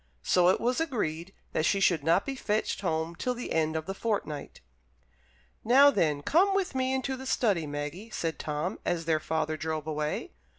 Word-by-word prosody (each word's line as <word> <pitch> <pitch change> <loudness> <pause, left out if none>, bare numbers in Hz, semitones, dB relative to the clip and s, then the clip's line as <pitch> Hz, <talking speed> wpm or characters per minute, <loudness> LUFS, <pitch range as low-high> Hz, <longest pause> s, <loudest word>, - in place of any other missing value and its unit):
So 180 -1 +4
it 185 - +3
was 250 +5 0
agreed 190 - -2 0.2
that - - +1
she 195 +4 +2
should 170 -6 +3
not 165 +5 +3
be 275 - -3
fetched 215 -6 -1
home 160 -2 -1
till 250 +8 -2
the 245 - -6
end 160 -1 +1
of 160 0 -2
the 195 - -4
fortnight. 195 -9 -3 1.0
"Now, 275 +5 +7
then, 150 - +1
come 385 - +3
with 390 -5 0
me 260 0 0
into 265 0 -1
the 265 +1 -8
study, 195 -12 +1
Maggie," 145 +9 -5
said 165 -7 -3
Tom, 150 +6 -3
as 170 -2 -1
their 160 -1 +2
father 155 0 -2
drove 155 -1 -3
away. 150 -1 -3
175 Hz, 185 wpm, -29 LUFS, 155-245 Hz, 1.0 s, Now